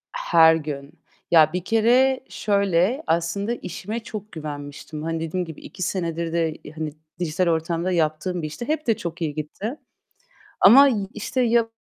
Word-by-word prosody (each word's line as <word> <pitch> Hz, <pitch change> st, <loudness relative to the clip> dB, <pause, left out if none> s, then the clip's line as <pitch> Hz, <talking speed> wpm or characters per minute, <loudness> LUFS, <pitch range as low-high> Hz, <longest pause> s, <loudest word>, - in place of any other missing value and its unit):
Her 165 Hz, -, +5 dB
gün. 145 Hz, -3 st, -5 dB, 0.4 s
Ya, 155 Hz, -1 st, +6 dB
bir 180 Hz, -, -2 dB
kere 245 Hz, +5 st, +3 dB
şöyle; 200 Hz, -, +1 dB
aslında 170 Hz, +7 st, 0 dB
işime 215 Hz, +2 st, -5 dB
çok 215 Hz, -2 st, -8 dB
güvenmiştim. 150 Hz, 0 st, -7 dB
Hani, 165 Hz, 0 st, -2 dB
dediğim 170 Hz, +3 st, -2 dB
gibi 160 Hz, -2 st, -10 dB
2 185 Hz, -, -7 dB
senedir 170 Hz, -2 st, -2 dB
de, 165 Hz, -2 st, +1 dB
iii, -, -, -10 dB
hani, 155 Hz, -1 st, -4 dB, 0.3 s
dijital 175 Hz, +1 st, 0 dB
ortamda 165 Hz, +2 st, 0 dB
yaptığım 165 Hz, +1 st, 0 dB
bir 155 Hz, -, -3 dB
işti. 155 Hz, -, -7 dB
Hep 305 Hz, -3 st, -2 dB
de 225 Hz, -, +3 dB
çok 170 Hz, -5 st, -6 dB
iyi 155 Hz, -2 st, -1 dB
gitti. 195 Hz, -, -5 dB, 0.8 s
Ama 270 Hz, +8 st, +9 dB
y 210 Hz, -7 st, -1 dB
işte, 235 Hz, +5 st, -2 dB
ya 230 Hz, -1 st, +3 dB
170 Hz, 160 wpm, -23 LUFS, 160-215 Hz, 0.8 s, Ama